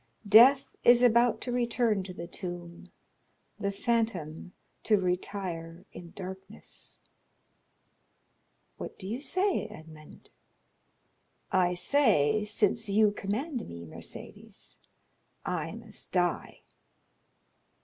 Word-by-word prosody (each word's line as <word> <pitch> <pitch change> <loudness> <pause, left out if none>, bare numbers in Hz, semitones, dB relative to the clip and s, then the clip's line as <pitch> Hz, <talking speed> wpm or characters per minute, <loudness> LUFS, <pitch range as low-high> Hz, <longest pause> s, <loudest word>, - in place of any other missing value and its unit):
Death 250 +7 +7 0.2
is 240 0 +6
about 235 0 +4
to 250 - -4
return 235 -3 +1
to 185 0 -7
the 170 -1 -7
tomb, 175 -1 -8 0.7
the 200 - -1
phantom 195 -7 -2 0.3
to 215 -2 +3
retire 180 -2 -3
in 170 - -10
darkness." 190 0 -10 1.8
"What - - -8
do 190 - -7
you 235 +6 -4
say, 370 +6 0
Edmond?" 155 -1 -14 1.2
"I 180 -1 +2
say, 210 - +3
since 215 +1 0
you 210 +1 +4
command 230 +7 -4
me, 85 0 -9
Mercédès, 80 - -10 0.7
I - - -3
must - - -7
die." - - -1
200 Hz, 100 wpm, -29 LUFS, 175-235 Hz, 1.8 s, Death